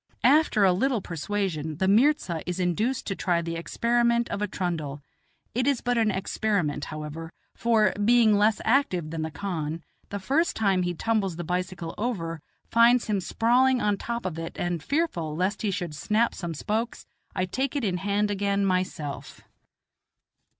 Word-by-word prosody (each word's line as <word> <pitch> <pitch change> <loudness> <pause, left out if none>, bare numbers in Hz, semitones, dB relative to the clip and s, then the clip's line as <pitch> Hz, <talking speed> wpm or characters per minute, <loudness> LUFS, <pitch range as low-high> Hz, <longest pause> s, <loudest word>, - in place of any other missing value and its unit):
After 295 -8 +4
a 185 - +5
little 255 +5 +1
persuasion 165 -3 -3
the 190 - +1
inirza 205 - +3
is 180 +1 -3
induced 210 +9 0
to 195 - -2
try 175 -3 +1
the 165 0 -3
experiment 235 +6 +1
of 205 - -3
a 210 - +1
trundle; 165 -7 -3 0.5
it 250 +3 0
is 280 -4 +2
but 245 0 0
an 225 -2 +3
experiment, 190 -6 -1
however, 155 +1 -7 0.2
for, 220 -4 +2
being 230 -1 +5
less 210 +1 +3
active 190 - +1
than 165 -1 -3
the 160 - -2
khan, 165 -3 -4 0.3
the 200 - -3
first 280 - +1
time 195 -4 +2
he 175 0 -1
tumbles 205 -2 0
the 175 - -5
bicycle 180 -1 -3
over 170 -9 -2 0.3
finds 235 +1 +5
him 210 -2 0
sprawling 245 +7 +3
on 210 -3 +1
top 235 +3 -4
of 165 -3 -3
it, 165 0 -6
and, 175 -2 -2
fearful 175 - -1
lest 185 +5 -1
he 215 - 0
should 175 -4 -3
snap 215 +9 +1
some 170 -3 -5
spokes, 220 +8 -3 0.3
I 185 - +1
take 265 +9 -2
it 280 - -1
in 185 -4 0
hand 205 +2 0
again 200 0 0
myself. 185 -6 -2
195 Hz, 170 wpm, -26 LUFS, 170-230 Hz, 0.5 s, a